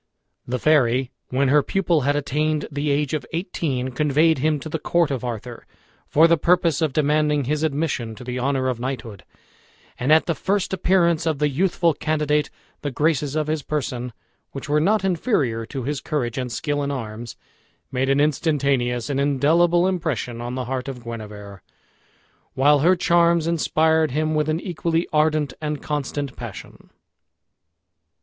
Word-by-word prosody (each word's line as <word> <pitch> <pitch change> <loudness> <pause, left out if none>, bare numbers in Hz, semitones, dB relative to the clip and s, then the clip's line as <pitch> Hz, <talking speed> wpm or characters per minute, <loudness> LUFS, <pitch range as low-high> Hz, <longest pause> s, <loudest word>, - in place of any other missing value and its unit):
The 125 +1 -1
fairy, 130 -3 +2 0.2
when 135 +1 +1
her 150 +2 +5
pupil 175 0 +1
had 145 +2 +1
attained 150 +1 -1
the 145 +1 -2
age 145 0 0
of 155 - -1
eighteen, 160 -7 -2
conveyed 150 +3 +2
him 155 +1 +1
to - - -6
the 155 +1 -3
court 170 -1 +1
of 130 -3 -3
Arthur 120 0 -6 0.4
for 160 +3 +5
the 170 -1 +3
purpose 170 -2 +2
of 155 -3 +1
demanding 150 0 +2
his 150 +4 -1
admission 140 -7 -1
to 125 - -10
the 125 0 -4
honor 130 0 0
of 125 -2 -2
knighthood; 120 -5 -5 0.8
and 130 +4 0
at 160 +1 +6
the 170 - 0
first 195 +4 -1
appearance 170 -3 +2
of 160 -3 0
the 150 +1 +1
youthful 170 +2 +1
candidate 150 -1 0 0.3
the 145 - -2
graces 145 +1 0
of 155 -1 0
his 155 0 -1
person, 130 -4 -3 0.4
which 135 - -6
were 150 +1 +2
not 200 +3 +2
inferior 150 - 0
to 135 -1 -5
his 145 +2 -3
courage 130 -6 -2
and 125 -1 -4
skill 145 +5 -2
in 140 - -2
arms, 115 -3 -6 0.6
made 130 +1 0
an 135 +1 +3
instantaneous 140 -5 +1
and 140 -2 -1
indelible 165 +6 +3
impression 155 -10 -2
on 120 +1 -4
the 130 -1 -3
heart 130 +1 -3
of 125 -3 -7
Guenever, 105 -4 -8 0.9
while 145 +2 +4
her 175 +6 +4
charms 170 -2 +3
inspired 160 -1 +2
him 155 +3 -1
with 155 0 0
an 155 +1 0
equally 170 -2 -1
ardent 150 -3 +2
and 150 -1 -3
constant 145 -2 -3
passion. 115 -5 -10
145 Hz, 165 wpm, -22 LUFS, 130-160 Hz, 0.9 s, at